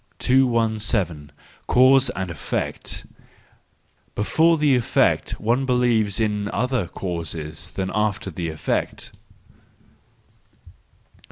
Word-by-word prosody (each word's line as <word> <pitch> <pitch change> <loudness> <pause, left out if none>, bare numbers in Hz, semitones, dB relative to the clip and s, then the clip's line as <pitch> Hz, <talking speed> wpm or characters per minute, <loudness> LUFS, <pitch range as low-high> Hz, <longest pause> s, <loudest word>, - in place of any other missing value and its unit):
217. 110 - +1 0.4
Cause 130 +1 +5
and 95 -2 -3
Effect 80 - -4 1.1
—Before 160 +10 +3
the 150 -2 +3
effect 125 - +1
one 120 +5 0
believes 120 -5 +2
in 105 -2 -1
other 125 -6 -1
causes 80 -4 -5
than 95 -1 -3
after 105 -2 -1
the 85 0 -4
effect. 80 - -3
105 Hz, 85 wpm, -22 LUFS, 90-125 Hz, 1.1 s, Cause